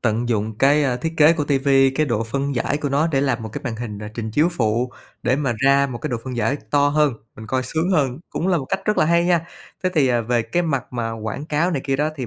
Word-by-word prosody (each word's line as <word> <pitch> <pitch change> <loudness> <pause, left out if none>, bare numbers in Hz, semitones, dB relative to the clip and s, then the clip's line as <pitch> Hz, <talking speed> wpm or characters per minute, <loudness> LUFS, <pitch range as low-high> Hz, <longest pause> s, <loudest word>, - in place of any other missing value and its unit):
tận 120 +1 0
dụng 110 -1 -1
cái, 145 +3 +4
a, 125 -2 +1
thiết 160 +6 -4
kế 155 +1 +6
của 150 -3 -1
TV, 140 -1 0 0.3
cái 155 +1 +1
độ 115 -3 -1
phân 140 +4 -2
giải 125 +4 0
của 145 - -2
nó 145 +4 +2
để 135 -5 +1
làm 130 -5 0
một 110 - -5
cái - - -6
màn 115 -3 -3
hình 110 -3 -6
n - - -9
trình 110 -2 -4
chiếu 150 +10 +3
phụ 120 -5 0 0.3
để 125 +2 +2
mà 140 -4 0
ra 140 +2 +4
một 125 -3 -6
cái 150 - -4
độ 120 - 0
phân 130 -2 -5
giải 120 +5 +1
to 145 0 +3
hơn, 150 -2 +2 0.2
mình 110 - -9
coi 130 +4 0
sướng 160 +7 -1
hơn, 140 -7 +1
cũng 180 - -2
là 180 - +3
một 140 - -5
cách 190 - -2
rất 210 - +1
là - - +5
hay 170 +1 +3
nha. 170 -2 +2 0.4
Thế 185 - +2
thì, 145 -5 +3
à, 120 -1 +2
về 120 0 0
cái 145 +11 -1
mặt 140 -7 -2
mà 115 -2 -2
quảng 110 +5 -5
cáo 155 +4 +1
này 145 - -1
kia 135 -1 0
đó, 150 +2 +1
thì 130 -3 -4
135 Hz, 290 wpm, -21 LUFS, 120-150 Hz, 0.4 s, kế